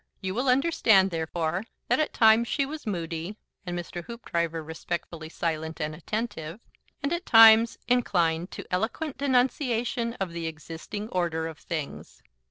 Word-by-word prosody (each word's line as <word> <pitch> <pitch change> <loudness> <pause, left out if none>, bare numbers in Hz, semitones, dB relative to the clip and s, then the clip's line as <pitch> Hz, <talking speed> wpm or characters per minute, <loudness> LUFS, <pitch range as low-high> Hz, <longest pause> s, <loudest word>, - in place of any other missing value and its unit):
You 190 -1 -3
will 255 +5 0
understand, 245 - +4
therefore, 165 +3 -2 0.2
that 245 - +2
at 310 - +1
times 225 +1 +5
she 280 +2 0
was 300 -2 -8
moody 170 +1 -4 0.3
(and 175 0 -3
Mr. 175 0 -6
Hoopdriver 170 -8 -3
respectfully 160 0 -5
silent 160 -1 -3
and 155 -1 -2
attentive) 180 -1 -4 0.4
and 280 - 0
at 345 +1 -2
times 225 0 +8
inclined 175 -9 +1
to - - -8
eloquent 245 +10 -2
denunciation 245 -3 +1
of 195 -6 -3
the 170 -1 -4
existing 165 +6 -7
order 170 -4 -1
of 160 -1 -7
things. 155 -4 -6
190 Hz, 145 wpm, -27 LUFS, 165-235 Hz, 0.4 s, times